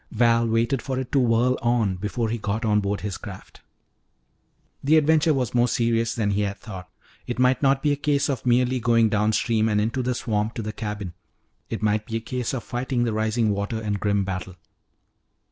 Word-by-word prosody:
Val 115 0 +3
waited 115 +3 +1
for 130 +1 -3
it 130 -1 -4
to 140 - +3
whirl 125 +1 +2
on 115 -5 +1
before 105 +5 -2
he 115 +1 -2
got 110 +3 -2
on 105 -1 +3
board 100 0 -2
his 100 -3 -4
craft. 95 -2 -11 1.2
The 155 +3 +5
adventure 155 +1 +4
was 130 -5 -1
more 120 0 +3
serious 115 -1 0
than 105 -3 0
he 100 +1 0
had 100 0 -2
thought. 95 -6 -9 0.4
It 120 - -3
might 125 +1 +3
not 135 -1 +2
be 150 - +3
a - - +2
case 145 -1 +1
of 135 -5 -2
merely 125 +1 +2
going 115 -1 +3
downstream 110 +1 +1
and 105 -1 +2
into 115 +5 0
the 125 0 -1
swamp 110 -1 -2
to 115 - -4
the 110 +1 -4
cabin; 105 -5 -5 0.6
it - - -4
might 105 0 +1
be 115 - -2
a - - -2
case 125 +1 -3
of 120 - -4
fighting 125 0 -2
the 115 -2 0
rising 110 0 +1
water 100 +3 -2
in 105 -2 -2
grim 100 0 0
battle. 95 -1 -5
115 Hz, 205 wpm, -24 LUFS, 105-125 Hz, 1.2 s, The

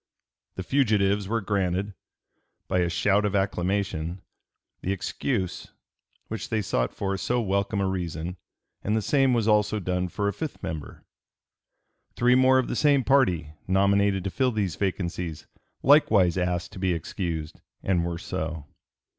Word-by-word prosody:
The 95 - -4
fugitives 105 -6 +2
were 115 +2 0
granted, 100 0 -1 0.7
"by 90 - +1
a 85 -1 +2
shout 100 +4 +2
of 105 -1 0
acclamation," 95 -3 -1 0.6
the 95 - -1
excuse 100 +1 -2 0.6
which 110 -2 -5
they 110 -2 0
sought - - 0
for 100 -1 -2
so 125 +5 0
welcome 100 -1 0
a 100 - +1
reason, 90 -1 -3 0.5
and 105 +2 +1
the 110 - -1
same 135 +1 +3
was 115 -2 +1
also 105 0 +3
done 90 -1 -1
for 100 +3 -2
a 100 - 0
fifth 160 -3 -6
member. 80 -3 -6 1.1
Three 125 +1 +4
more 130 +1 +5
of 130 - +1
the - - -2
same 145 -3 +3
party, 90 - +2
nominated 100 0 +3
to 95 - -3
fill 130 +3 +1
these 100 -7 -1
vacancies, 90 -4 -3 0.4
likewise 110 - +5
asked 90 -1 -1
to - - -9
be 90 -1 +1
excused, 80 -2 -4 0.2
and 90 -3 +1
were 85 0 -3
so. 80 -2 -4
95 Hz, 150 wpm, -26 LUFS, 90-110 Hz, 1.1 s, more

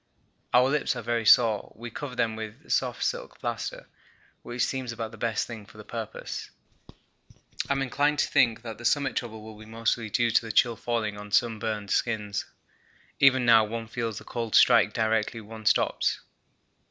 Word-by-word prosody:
Our 125 +1 +5
lips 150 -2 0
are 120 - -5
very 115 -1 -1
sore. 110 -3 +5
We 120 +1 -8
cover 135 +1 -6
them 115 -2 0
with 110 -1 -8
the - - -10
soft - - 0
silk - - -3
plaster - - -4 0.5
which 120 0 -1
seems 130 -3 -3
about 115 -1 -5
the 115 - -12
best 115 -2 0
thing 115 -3 -8
for 105 - -17
the 105 - -10
purpose. 115 0 -6 1.2
I'm 135 -1 +1
inclined 145 +3 +1
to - - +2
think 115 -2 +2
that 115 -2 -7
the - - -10
summit 140 +2 +1
trouble 110 -3 -4
will 110 -1 -11
be 110 - -12
mostly 115 0 -1
due 115 +2 +1
to - - +4
the 115 - -4
chill 120 +2 +3
falling 110 -3 -2
on 105 0 -9
sunburned 110 -2 0
skins. 105 -4 -1 0.7
Even 130 -2 +5
now 115 -2 +7
one 115 +1 -4
feels 115 -2 -3
the - - -8
cold 115 -3 -3
strike - - +6
directly 110 0 0
one 110 0 -8
stops. - - +2
115 Hz, 180 wpm, -27 LUFS, 110-120 Hz, 1.2 s, now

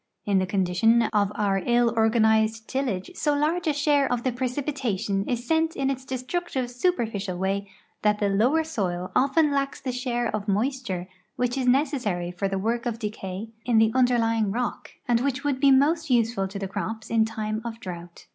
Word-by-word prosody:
In 200 -2 +3
the 185 - -1
con 190 0 +1
dition 225 +6 +3
of 205 -1 +2
our 200 -2 +1
ill 240 -1 +3
organized 220 -1 +2
tillage 255 - -2
so 295 -4 0
large 320 +4 0
a - - +4
share 285 -1 +2
of 245 -1 -1
the 255 - +1
precipi 260 +4 -2
tation 205 -6 -2
is 240 -1 -2
sent 320 +3 +1
in 275 0 0
its 265 -1 -5
destructive 260 0 -3
superficial 225 - -1
Avay 195 +2 -1 0.3
that 210 0 +2
the 205 - +1
lower 240 +11 +2
soil 185 - -3
often 290 +3 +3
lacks 275 0 -1
the 265 -2 -3
share 240 -2 -1
of 210 0 -5
moisture 210 -3 -1 0.3
which 245 0 0
is 260 -2 -1
necessary 245 - +1
for 180 +3 -2
the 195 0 -2
work 230 +4 -1
of 230 -2 -2
decay 210 -2 -5
in 240 -2 +2
the 220 0 +5
underlying 230 -4 +2
rock, 240 +4 -3 0.2
and 240 -1 +3
which 275 +1 -1
would 285 -3 0
be 280 - +5
most 300 +4 +3
use 235 -2 +3
ful 195 -4 -1
to 195 +1 -7
the 195 -1 -3
crops 220 +3 -5
in 225 -1 +4
time 220 -1 -3
of 230 -1 -6
drought. 175 -4 -9
235 Hz, 195 wpm, -25 LUFS, 205-265 Hz, 0.3 s, the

